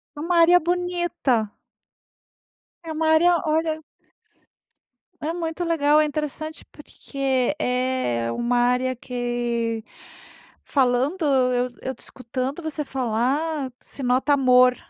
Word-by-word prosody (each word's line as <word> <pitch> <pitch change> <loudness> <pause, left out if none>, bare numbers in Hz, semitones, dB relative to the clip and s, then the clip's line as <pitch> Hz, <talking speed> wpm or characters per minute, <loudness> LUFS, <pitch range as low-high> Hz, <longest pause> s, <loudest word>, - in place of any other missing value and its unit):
É - - -9
uma 340 +3 0
área 350 +2 +7
bonita. 345 - -1 1.3
É 320 - -5
uma 315 +1 0
área, 340 +2 +5
olha 315 0 0 1.4
É 310 +2 -2
muito 335 0 -3
legal, 305 -3 +3
é - - +3
interessante 305 +1 -4
porque 275 -2 -2
é 250 - -1
uma 240 - 0
área 250 +1 +2
que 240 -2 -2 0.8
falando 270 +6 +1
eu 250 -3 +2
eu 265 - -4
te - - -28
escutando 260 +5 -5
você 310 -1 -2
falar, 265 +4 -1
se 275 - -7
nota 255 +4 +2
amor 255 -2 +5
270 Hz, 115 wpm, -23 LUFS, 250-315 Hz, 1.4 s, área